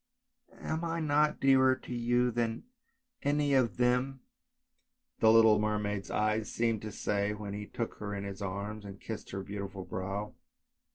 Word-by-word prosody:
" 245 Hz, -, -37 dB
Am 160 Hz, +1 st, -3 dB
I 165 Hz, 0 st, -1 dB
not 150 Hz, -1 st, +2 dB
dearer 130 Hz, -1 st, +5 dB
to 125 Hz, -, -8 dB
you 120 Hz, +1 st, +2 dB
than 115 Hz, -1 st, -1 dB, 0.6 s
any 145 Hz, 0 st, +1 dB
of 130 Hz, -4 st, +2 dB
them? 125 Hz, +2 st, +1 dB, 0.5 s
" -, -, -50 dB
the 110 Hz, -, +6 dB
little 110 Hz, -1 st, +7 dB
mermaid's 105 Hz, -2 st, -1 dB
eyes 110 Hz, 0 st, 0 dB
seemed 115 Hz, -2 st, 0 dB
to 110 Hz, -, -6 dB
say 100 Hz, 0 st, -1 dB
when 105 Hz, -1 st, -6 dB
he 105 Hz, 0 st, -5 dB
took 115 Hz, -, -4 dB
her 105 Hz, -1 st, -4 dB
in 100 Hz, -, -4 dB
his 100 Hz, 0 st, -6 dB
arms 100 Hz, +2 st, -4 dB
and 100 Hz, 0 st, -9 dB
kissed 110 Hz, -2 st, -7 dB
her 95 Hz, 0 st, -4 dB
beautiful 100 Hz, -1 st, -6 dB
brow. 95 Hz, +3 st, -4 dB
110 Hz, 170 wpm, -31 LUFS, 100-125 Hz, 0.6 s, little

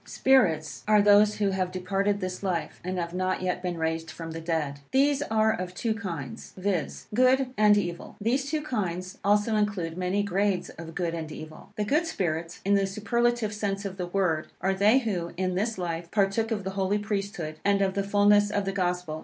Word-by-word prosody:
SPIRITS 160 Hz, -, +2 dB
are 210 Hz, 0 st, +6 dB
those 205 Hz, +1 st, +6 dB
who 200 Hz, -2 st, +1 dB
have 185 Hz, -1 st, -1 dB
departed 195 Hz, +2 st, 0 dB
this 185 Hz, 0 st, -4 dB
life, 185 Hz, -4 st, -3 dB
and 185 Hz, +1 st, -3 dB
have 170 Hz, -1 st, -3 dB
not 185 Hz, 0 st, -1 dB
yet 180 Hz, -1 st, -1 dB
been 180 Hz, -2 st, -3 dB
raised 160 Hz, 0 st, -2 dB
from 165 Hz, -1 st, -7 dB
the 165 Hz, 0 st, -6 dB
dead. 160 Hz, -4 st, -2 dB
These 280 Hz, +1 st, +3 dB
are 220 Hz, -4 st, +2 dB
of 180 Hz, 0 st, -5 dB
two 225 Hz, +4 st, 0 dB
kinds, 170 Hz, -, -6 dB
viz. 185 Hz, -4 st, -2 dB
Good 255 Hz, +2 st, +3 dB
and 210 Hz, -2 st, +5 dB
evil. 175 Hz, -4 st, -3 dB
These 260 Hz, +6 st, 0 dB
two 305 Hz, 0 st, -1 dB
kinds 185 Hz, -, -3 dB
also 205 Hz, +2 st, +3 dB
include 190 Hz, -5 st, -1 dB
many 185 Hz, +3 st, 0 dB
grades 200 Hz, -1 st, 0 dB
of 165 Hz, 0 st, -10 dB
good 170 Hz, -3 st, -1 dB
and 160 Hz, -2 st, -5 dB
evil. 155 Hz, 0 st, -10 dB
The 210 Hz, -, -1 dB
good 305 Hz, +10 st, +1 dB
spirits, 170 Hz, -, -3 dB
in 200 Hz, -, +3 dB
the 195 Hz, -1 st, +3 dB
superlative 220 Hz, +2 st, 0 dB
sense 200 Hz, -1 st, -2 dB
of 190 Hz, -1 st, -5 dB
the 180 Hz, -2 st, -3 dB
word, 175 Hz, -4 st, 0 dB
are 190 Hz, +1 st, +1 dB
they 205 Hz, +6 st, +4 dB
who, 195 Hz, -9 st, -2 dB
in 185 Hz, 0 st, 0 dB
this 215 Hz, +4 st, -1 dB
life, 170 Hz, -2 st, -3 dB
partook 205 Hz, +3 st, +1 dB
of 215 Hz, -4 st, -2 dB
the 190 Hz, -, -3 dB
Holy 195 Hz, +1 st, 0 dB
Priesthood, 195 Hz, -7 st, -3 dB
and 200 Hz, 0 st, +3 dB
of 190 Hz, -1 st, 0 dB
the 200 Hz, -, 0 dB
fulness 205 Hz, +1 st, +4 dB
of 205 Hz, -1 st, -1 dB
the 195 Hz, -, -1 dB
Gospel. 180 Hz, -4 st, -2 dB
195 Hz, 205 wpm, -27 LUFS, 175-210 Hz, -, are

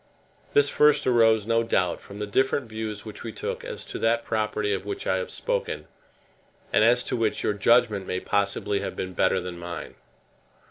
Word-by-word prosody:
This 145 Hz, 0 st, +5 dB
first 150 Hz, +1 st, +4 dB
arose, 115 Hz, -4 st, +4 dB
no 115 Hz, +1 st, +2 dB
doubt, 90 Hz, -6 st, 0 dB
from 100 Hz, -, -11 dB
the 105 Hz, -, -3 dB
different 130 Hz, +4 st, +1 dB
views 110 Hz, -1 st, -5 dB
which 110 Hz, -, -9 dB
we 115 Hz, -, -5 dB
took -, -, -5 dB
as -, -, -7 dB
to -, -, -6 dB
that 115 Hz, +1 st, +1 dB
property 105 Hz, -1 st, 0 dB
of 95 Hz, -, -2 dB
which 100 Hz, 0 st, -5 dB
I 95 Hz, -, +1 dB
have 95 Hz, -, -3 dB
spoken, -, -, -3 dB, 0.9 s
and -, -, +5 dB
as 120 Hz, +2 st, +4 dB
to -, -, -2 dB
which 115 Hz, -2 st, 0 dB
your -, -, +1 dB
judgment 105 Hz, -1 st, +3 dB
may 90 Hz, -, -1 dB
possibly 100 Hz, 0 st, 0 dB
have -, -, -4 dB
been 95 Hz, 0 st, -4 dB
better 95 Hz, -, +2 dB
than 90 Hz, -1 st, -6 dB
mine. 85 Hz, -3 st, -6 dB
105 Hz, 190 wpm, -26 LUFS, 100-115 Hz, 0.9 s, This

